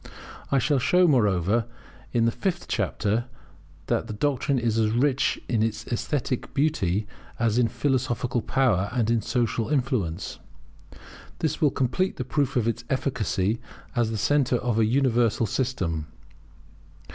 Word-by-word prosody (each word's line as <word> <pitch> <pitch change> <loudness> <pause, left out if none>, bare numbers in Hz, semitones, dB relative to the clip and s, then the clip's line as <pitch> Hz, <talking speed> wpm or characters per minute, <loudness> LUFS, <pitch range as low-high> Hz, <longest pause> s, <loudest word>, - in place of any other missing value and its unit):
I 140 - +4
shall 140 +1 +2
show, 180 +7 +4
moreover, 105 - +2 0.4
in 115 -2 +2
the 115 - +3
fifth 180 - -2
chapter, 105 +3 0 0.6
that - - 0
the - - -5
doctrine 140 +3 0
is 115 -2 +1
as 110 -1 +3
rich 130 +4 +1
in 115 -3 +1
esthetic 115 +4 -2
beauty 110 - +1 0.3
as 115 0 +1
in 120 - +4
philosophical 125 -1 -1
power 105 -7 +1
and 115 -3 +1
in 115 -1 +2
social 115 0 -1
influence. 125 - -1 1.0
This 155 -1 -2
will 150 - +5
complete 140 +8 0
the 130 - -4
proof 140 0 0
of 120 -3 +1
its 115 - -1
efficacy 115 -5 0 0.3
as 120 -2 +2
the 110 - -2
centre 135 +2 +2
of 120 -2 -1
a 110 - +4
universal 120 -3 +2
system. 95 - -2
120 Hz, 140 wpm, -25 LUFS, 110-135 Hz, 1.0 s, will